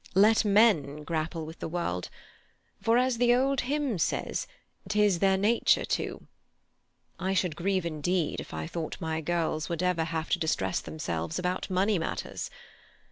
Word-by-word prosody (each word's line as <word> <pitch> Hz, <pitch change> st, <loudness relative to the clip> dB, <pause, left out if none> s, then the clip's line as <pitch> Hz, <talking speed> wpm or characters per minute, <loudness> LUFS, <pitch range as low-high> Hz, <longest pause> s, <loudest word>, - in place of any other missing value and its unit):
"Let 215 Hz, +4 st, +6 dB
men 195 Hz, -9 st, +3 dB
grapple 160 Hz, +1 st, -2 dB
with 160 Hz, +2 st, -10 dB
the -, -, -3 dB
world; 160 Hz, -, -2 dB, 0.7 s
for, 230 Hz, +1 st, +3 dB
as 250 Hz, -1 st, +2 dB
the 245 Hz, 0 st, +5 dB
old 270 Hz, +1 st, +2 dB
hymn 275 Hz, -, -1 dB
says, -, -, -1 dB, 0.4 s
"'tis 210 Hz, -4 st, +3 dB
their 195 Hz, 0 st, +4 dB
nature 215 Hz, +5 st, +3 dB
to." -, -, -3 dB, 0.9 s
I 190 Hz, +2 st, 0 dB
should 180 Hz, -4 st, +1 dB
grieve 185 Hz, +1 st, 0 dB
indeed 165 Hz, +1 st, -1 dB
if -, -, -8 dB
I -, -, -4 dB
thought 165 Hz, -1 st, -5 dB
my 160 Hz, -1 st, -2 dB
girls 160 Hz, -1 st, -1 dB
would 170 Hz, +1 st, -2 dB
ever 180 Hz, -3 st, +1 dB
have 160 Hz, 0 st, -3 dB
to 180 Hz, -, +2 dB
distress 95 Hz, -, 0 dB
themselves 85 Hz, -, -4 dB
about 180 Hz, +2 st, -2 dB
money 190 Hz, +1 st, +2 dB
matters. 165 Hz, -, -4 dB
175 Hz, 155 wpm, -29 LUFS, 160-210 Hz, 0.9 s, Let